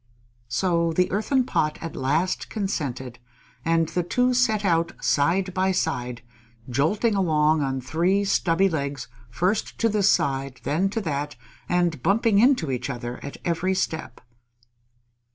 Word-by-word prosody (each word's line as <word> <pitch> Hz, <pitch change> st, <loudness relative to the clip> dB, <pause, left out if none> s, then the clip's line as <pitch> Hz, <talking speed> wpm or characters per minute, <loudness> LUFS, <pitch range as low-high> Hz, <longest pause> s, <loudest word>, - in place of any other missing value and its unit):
So 170 Hz, +5 st, +1 dB
the 180 Hz, +2 st, +1 dB
Earthen 255 Hz, +6 st, +1 dB
Pot 155 Hz, -9 st, 0 dB
at 165 Hz, -2 st, -6 dB
last 155 Hz, +8 st, 0 dB
consented, 130 Hz, -, -3 dB, 0.4 s
and 165 Hz, 0 st, +2 dB
the 180 Hz, -, 0 dB
two 250 Hz, +8 st, +1 dB
set 220 Hz, -4 st, +2 dB
out 165 Hz, -2 st, +1 dB
side 180 Hz, +6 st, +1 dB
by 190 Hz, +1 st, +1 dB
side, 125 Hz, -9 st, -2 dB, 0.4 s
jolting 160 Hz, -, +1 dB
along 155 Hz, -5 st, +2 dB
on 135 Hz, -1 st, -1 dB
three 170 Hz, +10 st, +1 dB
stubby 190 Hz, -1 st, +2 dB
legs 140 Hz, -6 st, -3 dB, 0.2 s
first 185 Hz, -, -1 dB
to 230 Hz, -, +2 dB
this 205 Hz, -2 st, +3 dB
side, 135 Hz, -1 st, 0 dB
then 175 Hz, +7 st, +1 dB
to 225 Hz, +3 st, -2 dB
that, 145 Hz, -4 st, -3 dB, 0.3 s
and 175 Hz, -5 st, +1 dB
bumping 205 Hz, -, +3 dB
into 235 Hz, -, +3 dB
each 125 Hz, +1 st, -3 dB
other 120 Hz, -2 st, -5 dB
at 140 Hz, -, -7 dB
every 175 Hz, +2 st, 0 dB
step. 160 Hz, -3 st, -3 dB
165 Hz, 140 wpm, -24 LUFS, 140-195 Hz, 0.4 s, this